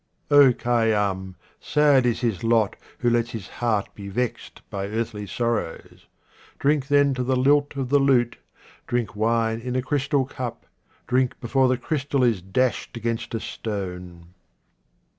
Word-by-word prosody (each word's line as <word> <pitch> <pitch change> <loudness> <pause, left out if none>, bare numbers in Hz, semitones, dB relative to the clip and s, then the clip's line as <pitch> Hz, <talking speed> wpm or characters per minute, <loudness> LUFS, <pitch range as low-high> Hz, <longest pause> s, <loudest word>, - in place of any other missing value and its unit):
Khayyam, 115 -8 +3 0.2
sad 145 -4 +3
is 120 - 0
his 115 -6 -1
lot 115 -3 +2 0.2
who 120 - +1
lets 120 0 +1
his 110 -4 -6
heart 110 -4 -1
be 100 -1 -8
vexed 120 +4 -4
by 100 0 -3
earthly 110 -1 -3
sorrows. 115 -6 -3 0.5
Drink 140 -1 +1
then 145 -1 +4
to 125 -1 -2
the 130 +1 +1
lilt 145 +3 +3
of 135 -2 -3
the 145 +1 +4
lute, 130 -4 +2 0.5
drink 120 -6 -2
wine 115 +1 +1
in 125 +1 -4
a 130 - +1
crystal 140 0 0
cup, 125 -3 -6 0.4
drink 130 0 0
before 130 +2 +2
the 130 0 +2
crystal 145 -2 -1
is 115 -7 +2
dashed 115 +6 -1
against 115 0 -3
a - - -1
stone. 90 -6 -6
120 Hz, 145 wpm, -24 LUFS, 105-130 Hz, 0.5 s, then